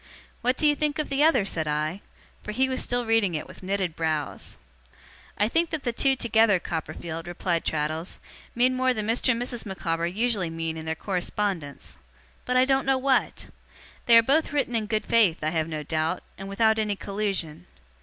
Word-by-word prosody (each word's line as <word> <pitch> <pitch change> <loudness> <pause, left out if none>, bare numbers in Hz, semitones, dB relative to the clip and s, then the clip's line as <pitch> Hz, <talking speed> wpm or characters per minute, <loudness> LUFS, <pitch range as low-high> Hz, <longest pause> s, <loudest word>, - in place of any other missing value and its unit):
'What 250 +2 +1
do - - +1
you 295 - +6
think 300 0 -1
of 305 - -2
the 280 +1 +2
other?' 265 -10 +4
said 160 -5 -2
I. 155 +5 -1 0.4
For 210 - -6
he 265 +4 +2
was 260 0 -1
still 245 -1 0
reading 225 -6 +2
it 155 - -4
with - - -13
knitted 190 -3 -2
brows. 155 -3 -3 0.8
'I 210 - +2
think 330 +5 +1
that 315 -4 -4
the 240 - -1
two 270 +3 +3
together, 225 -4 +3
Copperfield,' 165 0 -5
replied 175 -1 -1
Traddles, 155 +3 -2 0.4
'mean 250 +2 +3
more 255 0 +2
than 215 -1 -2
Mr. 230 +4 +1
and 235 -2 +2
Mrs. 245 -1 -3
Micawber 170 -4 -2
usually 205 -1 0
mean 165 0 -3
in 160 0 -7
their 160 - -1
correspondence 180 -4 -3 0.5
but 250 0 +1
I 255 - +5
don't 270 0 +1
know 270 -1 +4
what. 265 0 0 0.6
They 235 -1 +8
are 230 - +7
both 285 +6 +2
written 275 -5 0
in 220 -2 -1
good 215 0 -1
faith, 205 -10 +3
I 155 - +1
have 160 -1 0
no 155 -2 -4
doubt, 155 +1 -1
and 195 0 -8
without 220 +2 +2
any 210 -1 0
collusion. 195 - -3
210 Hz, 195 wpm, -26 LUFS, 165-250 Hz, 0.8 s, They